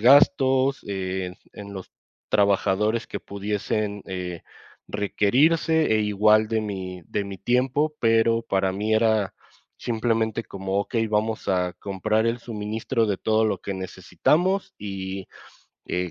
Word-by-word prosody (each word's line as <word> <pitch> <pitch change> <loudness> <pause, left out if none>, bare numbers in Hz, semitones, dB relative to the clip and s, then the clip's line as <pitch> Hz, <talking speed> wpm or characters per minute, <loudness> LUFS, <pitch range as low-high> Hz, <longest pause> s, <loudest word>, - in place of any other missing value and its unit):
gastos, 135 +1 +5
eh, 95 -2 -3 0.2
en 100 -1 -9
los 95 -2 -9 0.4
trabajadores 100 +2 +2
que - - -6
pudiesen, 105 0 -3
eh, 90 -2 -5 0.5
requerirse, 145 - +2
e 110 - +3
igual 105 +1 +4
de 110 -1 +1
mi 95 -4 -5
de 105 - -2
mi 100 -1 -7
tiempo, 130 - +1
pero 115 0 +3
para 95 -3 0
mí 105 +3 -1
era 110 -3 +2 0.4
simplemente 115 -1 0
como 95 0 -3
okey, 115 +2 -1
vamos 110 +1 -1
a 90 -1 +1
comprar 105 +4 -1
el 115 +1 0
suministro 110 0 -2
de 100 -2 0
todo 110 +3 +2
lo 110 - 0
que 100 - -4
necesitamos 175 - 0
y, 95 -2 -5 0.6
eh, 90 0 -2
105 Hz, 130 wpm, -24 LUFS, 95-115 Hz, 0.6 s, gastos